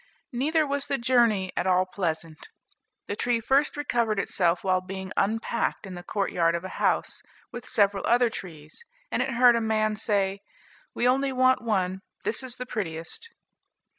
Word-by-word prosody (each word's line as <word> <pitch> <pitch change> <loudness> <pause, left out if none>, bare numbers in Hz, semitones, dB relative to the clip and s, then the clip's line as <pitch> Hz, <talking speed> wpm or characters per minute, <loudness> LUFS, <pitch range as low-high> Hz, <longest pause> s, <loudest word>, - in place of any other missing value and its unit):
Neither 305 +5 +1
was 280 0 -2
the 275 - 0
journey 235 -6 +2
at - - -1
all 185 0 +3
pleasant. 165 -4 -4 0.6
The 205 - -4
tree 240 +2 0
first 275 +6 +2
recovered 235 -7 0
itself 175 -3 +1
while 185 -1 +2
being 190 0 -7
unpacked 225 +2 -1
in 190 - -8
the 175 - -7
courtyard 175 -4 0
of 170 - -3
a 190 - -5
house, - - +1 0.3
with 245 - -8
several 200 -1 +2
other 240 0 +4
trees; 160 - -9 0.3
and - - 0
it - - -1
heard 245 0 +6
a 230 - +1
man 215 -1 +1
say, 200 -2 0 0.6
"We 245 - +2
only 270 +2 +2
want 255 -2 +3
one, 195 -6 0
and 190 0 -9 0.2
this 225 - 0
is 255 -2 -5
the 250 - -6
prettiest." 200 - -5
215 Hz, 170 wpm, -26 LUFS, 185-250 Hz, 0.6 s, heard